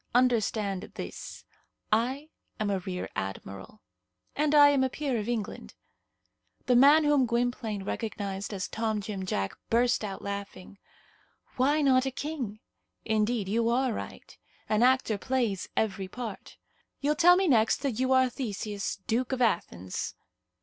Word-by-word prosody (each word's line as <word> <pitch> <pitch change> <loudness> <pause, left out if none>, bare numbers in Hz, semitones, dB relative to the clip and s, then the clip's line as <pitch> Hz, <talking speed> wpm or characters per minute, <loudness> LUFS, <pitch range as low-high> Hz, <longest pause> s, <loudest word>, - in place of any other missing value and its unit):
Understand 220 -6 +1
this: - - -8 0.5
I 260 +7 0 0.3
am 210 -1 0
a 195 - 0
rear 180 0 -5
admiral." 95 +1 -6 0.5
"And 300 +1 +2
I 290 -1 +9
am 280 -2 +3
a 260 - +1
peer 265 -3 -2
of 210 +2 -4
England." 225 -4 -4 0.9
The 250 - +3
man 285 +5 +7
whom 290 -4 +3
Gwynplaine 235 -3 -1
recognized 200 -2 -4
as 200 -1 -3
Tom 220 -1 -1
Jim 195 -2 -5
Jack 100 - -2
burst 240 0 +2
out 195 -2 -5
laughing. 200 -1 -7 0.8
"Why 285 +4 +2
not 265 -1 +4
a - - -1
king? 260 -7 -5 0.4
Indeed, 215 -1 0
you 230 +3 +1
are 250 0 +1
right. - - -8 0.3
An 215 +1 +1
actor 250 -4 +3
plays 235 -7 -1
every 195 -3 0
part. 225 0 -7 0.4
You'll 290 +2 +1
tell 350 +3 +6
me 380 0 +2
next 230 -1 +3
that 255 -5 -1
you 260 0 +1
are 260 0 +5
Theseus, 210 -5 -4
Duke 245 +3 0
of 260 - -1
Athens." 130 - -1
230 Hz, 145 wpm, -28 LUFS, 200-260 Hz, 0.9 s, I